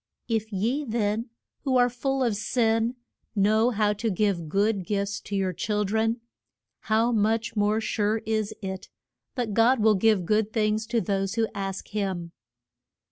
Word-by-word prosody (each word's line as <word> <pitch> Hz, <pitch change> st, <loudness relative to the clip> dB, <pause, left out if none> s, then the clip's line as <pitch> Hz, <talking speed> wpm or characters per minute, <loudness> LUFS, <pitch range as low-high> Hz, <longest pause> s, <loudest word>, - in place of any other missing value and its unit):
If 225 Hz, -1 st, -1 dB
ye 230 Hz, +9 st, 0 dB
then, 225 Hz, -1 st, -1 dB, 0.3 s
who 265 Hz, -3 st, +2 dB
are 245 Hz, 0 st, +5 dB
full 265 Hz, +2 st, -1 dB
of 235 Hz, -4 st, +1 dB
sin, 225 Hz, +2 st, +1 dB, 0.4 s
know 215 Hz, +3 st, +3 dB
how 210 Hz, -3 st, +1 dB
to 220 Hz, +2 st, -2 dB
give 185 Hz, -5 st, 0 dB
good 200 Hz, +2 st, +1 dB
gifts 200 Hz, +1 st, -2 dB
to 200 Hz, -, -6 dB
your 190 Hz, -2 st, 0 dB
chil 210 Hz, +4 st, -1 dB
dren, 225 Hz, +3 st, 0 dB, 0.6 s
how 225 Hz, +2 st, +1 dB
much 225 Hz, +1 st, +1 dB
more 210 Hz, +1 st, +2 dB
sure 215 Hz, -1 st, 0 dB
is 215 Hz, -1 st, 0 dB
it 190 Hz, 0 st, -5 dB, 0.5 s
that 240 Hz, -5 st, -2 dB
God 230 Hz, +4 st, +4 dB
will 215 Hz, 0 st, +5 dB
give 210 Hz, -2 st, +3 dB
good 215 Hz, +2 st, +1 dB
things 215 Hz, 0 st, 0 dB
to 230 Hz, -1 st, +1 dB
those 195 Hz, 0 st, -1 dB
who 225 Hz, -1 st, +2 dB
ask 195 Hz, -1 st, -4 dB
him. 190 Hz, -5 st, -3 dB
215 Hz, 160 wpm, -26 LUFS, 200-225 Hz, 0.6 s, are